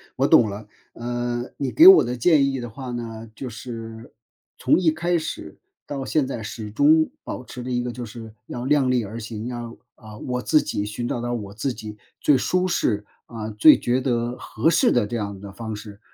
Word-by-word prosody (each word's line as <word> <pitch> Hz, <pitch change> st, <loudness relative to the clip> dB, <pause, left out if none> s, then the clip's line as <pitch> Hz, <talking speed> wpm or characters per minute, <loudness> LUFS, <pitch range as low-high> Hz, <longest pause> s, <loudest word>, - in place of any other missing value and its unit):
我 -, -, +2 dB
懂 115 Hz, -, +6 dB
了。 105 Hz, +1 st, -8 dB, 0.3 s
嗯， 120 Hz, +1 st, -3 dB
你 140 Hz, -, -2 dB
给 335 Hz, +4 st, +8 dB
我 385 Hz, -, +10 dB
的 125 Hz, -, -3 dB
建 140 Hz, +3 st, +4 dB
议 135 Hz, -, -3 dB
的 120 Hz, -1 st, -6 dB
话 130 Hz, +2 st, -7 dB
呢， 115 Hz, -2 st, -6 dB
就 130 Hz, -, -6 dB
是， 115 Hz, 0 st, -9 dB, 0.5 s
从 -, -, +3 dB
一 170 Hz, -3 st, +3 dB
开 170 Hz, +2 st, 0 dB
始， 155 Hz, -, -6 dB, 0.3 s
到 135 Hz, -2 st, -4 dB
现 150 Hz, -4 st, +1 dB
在 120 Hz, -5 st, -5 dB
始 110 Hz, 0 st, -6 dB
终 155 Hz, +8 st, +4 dB
保 125 Hz, -, -6 dB
持 125 Hz, 0 st, -9 dB
着 125 Hz, -, -5 dB
一 120 Hz, 0 st, 0 dB
个 125 Hz, -, -3 dB
就 120 Hz, 0 st, -6 dB
是， 110 Hz, 0 st, -10 dB, 0.2 s
要 120 Hz, 0 st, -5 dB
量 140 Hz, -2 st, +3 dB
力 125 Hz, -2 st, +1 dB
而 110 Hz, +3 st, -7 dB
行， 110 Hz, +1 st, -6 dB
要 120 Hz, -1 st, -6 dB, 0.2 s
啊， 110 Hz, -2 st, -12 dB
我 125 Hz, 0 st, -3 dB
自 155 Hz, +4 st, +3 dB
己 100 Hz, -, -3 dB
寻 120 Hz, +3 st, -4 dB
找 120 Hz, -, -2 dB
到 120 Hz, 0 st, -3 dB
我 105 Hz, -4 st, -5 dB
自 120 Hz, +4 st, -2 dB
己 105 Hz, -2 st, -9 dB, 0.2 s
最 145 Hz, -3 st, +4 dB
舒 185 Hz, +7 st, +1 dB
适， 105 Hz, -, 0 dB, 0.2 s
啊， 110 Hz, -2 st, -6 dB
最 105 Hz, +9 st, +7 dB
觉 125 Hz, +2 st, +1 dB
得 120 Hz, -1 st, -1 dB
合 120 Hz, +9 st, 0 dB
适 165 Hz, -, +3 dB
的 115 Hz, -4 st, +2 dB
这 120 Hz, -, -3 dB
样 100 Hz, -2 st, -4 dB
的 100 Hz, 0 st, -9 dB
方 110 Hz, +2 st, -6 dB
式， 105 Hz, -1 st, -10 dB
120 Hz, 230 characters per minute, -23 LUFS, 110-130 Hz, 0.5 s, 我